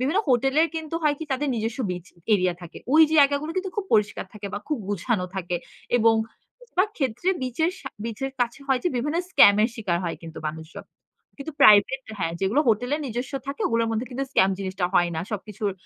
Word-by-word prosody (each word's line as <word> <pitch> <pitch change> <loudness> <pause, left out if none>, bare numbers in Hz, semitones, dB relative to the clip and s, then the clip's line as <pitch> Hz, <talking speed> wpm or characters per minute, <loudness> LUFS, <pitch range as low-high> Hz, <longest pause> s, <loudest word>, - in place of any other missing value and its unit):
বিভিন্ন 285 +9 +1
হোটেলের 270 +6 +3
কিন্তু 320 0 -5
হয়কি 300 +1 +1
তাদের 280 +2 -1
নিজস্ব 225 +2 -3
বিচ 180 -1 -5 0.3
এরিয়া 180 -2 +1
থাকে। 170 - -10 0.2
ওই 320 - +8
জায়গাগুলো 285 0 +4
কিন্তু 375 0 -2
খুব 410 - -1
পরিষ্কার 210 -1 +1
থাকে 210 -1 -7
বা - - -2
খুব 300 -5 -1
গুছানো 200 -1 -1
থাকে 175 -1 -2 0.4
এবং 225 -1 +4 0.5
বেশিরভাগ 420 -5 0
ক্ষেত্রে 265 +6 -1
বিচের 285 +7 0
সা 265 - -6 0.2
বিচের 250 +4 -4
কাছে 240 +3 -1
হয় 265 -2 +2
যে, - - +3
বিভিন্ন 295 +7 -1
স্কামের 210 - +6
শিকার 185 -7 -1
হয় 170 - -3
কিন্তু 165 -1 -9
মানুষজন। 160 +1 -7 0.5
কিন্তু 295 +3 -6
প্রাইভেট 215 +6 +6 0.2
হ্যাঁ, 165 -3 -1
যেগুলো 205 +10 +2
হোটেলের 245 +7 +1
নিজস্ব 245 +4 -4
থাকে 275 +1 -5
ওগুলোর 230 0 +1
মধ্যে 225 +3 -2
কিন্তু 270 +2 -3
স্ক্যাম 190 -7 +4
জিনিসটা 190 -1 -3
হয় 175 -1 +4
না। - - -1
সবকিছুর 210 0 -3
235 Hz, 185 wpm, -24 LUFS, 200-280 Hz, 0.5 s, ওই